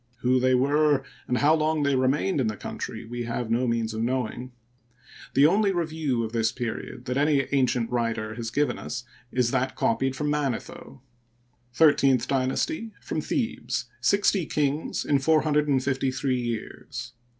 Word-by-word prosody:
Who 130 Hz, +1 st, +3 dB
they 130 Hz, 0 st, +3 dB
were, 145 Hz, +2 st, +3 dB, 0.2 s
and 125 Hz, -, +1 dB
how 145 Hz, +4 st, +4 dB
long 155 Hz, -1 st, +1 dB
they 140 Hz, -1 st, +2 dB
remained 135 Hz, +5 st, +1 dB
in 120 Hz, -, +1 dB
the 105 Hz, -2 st, -3 dB
country, 115 Hz, -, -6 dB
we 120 Hz, +1 st, -5 dB
have 115 Hz, 0 st, -3 dB
no 125 Hz, +2 st, +2 dB
means 115 Hz, -1 st, 0 dB
of 110 Hz, -, -3 dB
knowing. 125 Hz, +1 st, -2 dB, 0.8 s
The 140 Hz, -, +6 dB
only 200 Hz, +5 st, +4 dB
review 155 Hz, -8 st, -1 dB
of 110 Hz, -, -4 dB
this 115 Hz, -1 st, +1 dB
period 120 Hz, +1 st, -5 dB
that 125 Hz, +1 st, -2 dB
any 145 Hz, -1 st, +3 dB
ancient 125 Hz, -4 st, +1 dB
writer 115 Hz, -3 st, -1 dB
has 115 Hz, 0 st, -4 dB
given 145 Hz, +5 st, 0 dB
us -, -, -5 dB, 0.3 s
is 125 Hz, -2 st, +1 dB
that 130 Hz, 0 st, 0 dB
copied 135 Hz, +3 st, 0 dB
from 150 Hz, +2 st, -1 dB
Ma 150 Hz, -1 st, +1 dB
netho: 125 Hz, +2 st, -7 dB, 0.7 s
XIII 140 Hz, -4 st, +5 dB
Dynasty: 135 Hz, -, -1 dB
from -, -, -3 dB
Thebes, -, -, -2 dB
60 200 Hz, -4 st, +2 dB
kings 150 Hz, +1 st, -1 dB
in 140 Hz, -1 st, +3 dB
453 140 Hz, -3 st, +1 dB
years. 120 Hz, 0 st, -5 dB
130 Hz, 155 wpm, -26 LUFS, 120-150 Hz, 0.8 s, The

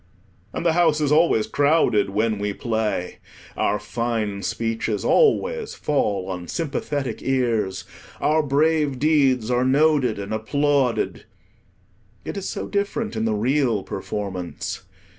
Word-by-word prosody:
And -, -, -5 dB
the 165 Hz, -, +4 dB
house 165 Hz, -3 st, +3 dB
is 150 Hz, -2 st, +1 dB
always 150 Hz, -8 st, +4 dB
crowded 140 Hz, -9 st, +2 dB
when 110 Hz, +1 st, 0 dB
we 105 Hz, 0 st, -2 dB
play. 110 Hz, -6 st, -2 dB, 0.4 s
Our 105 Hz, -, +1 dB
fine 105 Hz, -2 st, -2 dB
speeches 115 Hz, -2 st, -2 dB
always 470 Hz, 0 st, +2 dB
fall 100 Hz, -10 st, -1 dB
on 90 Hz, -2 st, -5 dB
sympathetic 145 Hz, -6 st, -3 dB
ears, 115 Hz, -8 st, 0 dB, 0.4 s
our 155 Hz, +1 st, +3 dB
brave 150 Hz, -1 st, +1 dB
deeds 135 Hz, -5 st, +2 dB
are 125 Hz, 0 st, +2 dB
noted 135 Hz, -3 st, +3 dB
and 100 Hz, +1 st, -5 dB
applauded. 140 Hz, +3 st, 0 dB, 1.0 s
It -, -, -5 dB
is 195 Hz, -1 st, -4 dB
so -, -, -4 dB
different 205 Hz, +2 st, -2 dB
in 110 Hz, 0 st, -1 dB
the 110 Hz, -1 st, +1 dB
real 120 Hz, -2 st, +1 dB
performance. 95 Hz, -3 st, -5 dB
125 Hz, 125 wpm, -23 LUFS, 105-150 Hz, 1.0 s, the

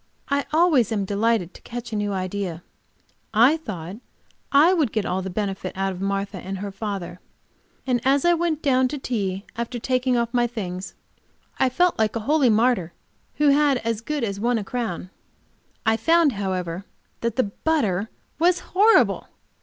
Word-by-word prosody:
I 280 Hz, 0 st, 0 dB
always 305 Hz, -, +3 dB
am 205 Hz, -3 st, 0 dB
delighted 205 Hz, -2 st, 0 dB
to -, -, -14 dB
catch 240 Hz, -1 st, -7 dB
a -, -, 0 dB
new 205 Hz, -1 st, -1 dB
idea; 185 Hz, -3 st, -3 dB, 0.7 s
I 245 Hz, +8 st, +6 dB
thought 190 Hz, -, -7 dB, 0.5 s
I 305 Hz, +6 st, +6 dB
would 305 Hz, -, +1 dB
get 215 Hz, -2 st, -1 dB
all 185 Hz, +1 st, -1 dB
the 190 Hz, -, -5 dB
benefit 195 Hz, -1 st, -4 dB
out 195 Hz, 0 st, 0 dB
of 185 Hz, 0 st, -7 dB
Martha 195 Hz, 0 st, -2 dB
and 190 Hz, +2 st, -5 dB
her 200 Hz, +1 st, -5 dB
father, 195 Hz, -4 st, -5 dB, 0.7 s
and 250 Hz, -2 st, +1 dB
as 275 Hz, +3 st, +3 dB
I 345 Hz, -, +5 dB
went 335 Hz, -2 st, -1 dB
down 260 Hz, -3 st, +3 dB
to 290 Hz, +3 st, -4 dB
tea, 200 Hz, -7 st, -3 dB
after 235 Hz, +1 st, -3 dB
taking 255 Hz, +1 st, +1 dB
off 235 Hz, 0 st, -1 dB
my 240 Hz, -1 st, +3 dB
things, 190 Hz, -5 st, -6 dB, 0.7 s
felt 355 Hz, +5 st, +2 dB
like 220 Hz, 0 st, +1 dB
a 230 Hz, -, -1 dB
holy 280 Hz, +2 st, +3 dB
martyr 220 Hz, -6 st, +2 dB, 0.4 s
who 295 Hz, -1 st, +3 dB
had 285 Hz, -1 st, +4 dB
as 230 Hz, -1 st, -1 dB
good 295 Hz, +2 st, -3 dB
as 200 Hz, -3 st, -2 dB
won 240 Hz, +2 st, +1 dB
a 215 Hz, -, -2 dB
crown. 195 Hz, -5 st, -4 dB, 0.7 s
I 220 Hz, 0 st, +3 dB
found, 325 Hz, +5 st, +4 dB
however, 185 Hz, -4 st, -3 dB, 0.4 s
that 235 Hz, -1 st, -2 dB
the 255 Hz, -, +3 dB, 0.2 s
butter 220 Hz, -, +1 dB, 0.3 s
was 355 Hz, +2 st, +4 dB
horrible. 425 Hz, +4 st, +3 dB
230 Hz, 170 wpm, -23 LUFS, 195-275 Hz, 0.7 s, I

